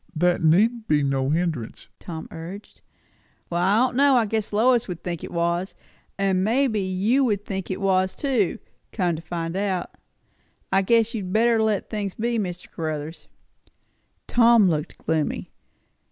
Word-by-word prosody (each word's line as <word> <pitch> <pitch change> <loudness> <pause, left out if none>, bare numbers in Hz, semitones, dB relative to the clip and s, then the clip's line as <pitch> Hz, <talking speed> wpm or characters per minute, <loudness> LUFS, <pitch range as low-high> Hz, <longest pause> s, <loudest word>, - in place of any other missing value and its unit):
"That 175 +2 +2
need 215 +8 +3
be 150 -1 +2
no 135 -1 0
hindrance," 155 -7 -2
Tom 160 -2 -7
urged. 170 +5 -9 0.7
"Well, 170 0 0
I 190 +3 +3
don' 245 - -11
know. 280 -1 +5
I 235 -3 +4
guess 220 0 -2
Lois 240 +3 +3
would 180 -3 -7
think 170 -3 -4
it - - -6
was. 170 +2 -1 0.4
And 190 -1 +1
maybe 230 +1 +1
you 195 +8 +1
would 205 -4 -1
think 190 -2 -4
it 190 - -3
was, 190 -1 +1
too, 255 - 0 0.3
come 180 -5 0
to 160 - -7
find 165 0 -4
out. 190 -3 -2 0.8
I 195 0 +4
guess 230 +3 +2
you'd 195 -5 -4
better 225 +2 +3
let 215 -3 0
things 205 -3 -3
be, 235 +1 -1
Mr. 180 -3 -4
Caruthers." 155 -1 -5 1.0
Tom 235 -3 +5
looked 150 -1 -2
very - - -28 0.2
gloomy. - - -5
190 Hz, 160 wpm, -24 LUFS, 170-220 Hz, 1.0 s, know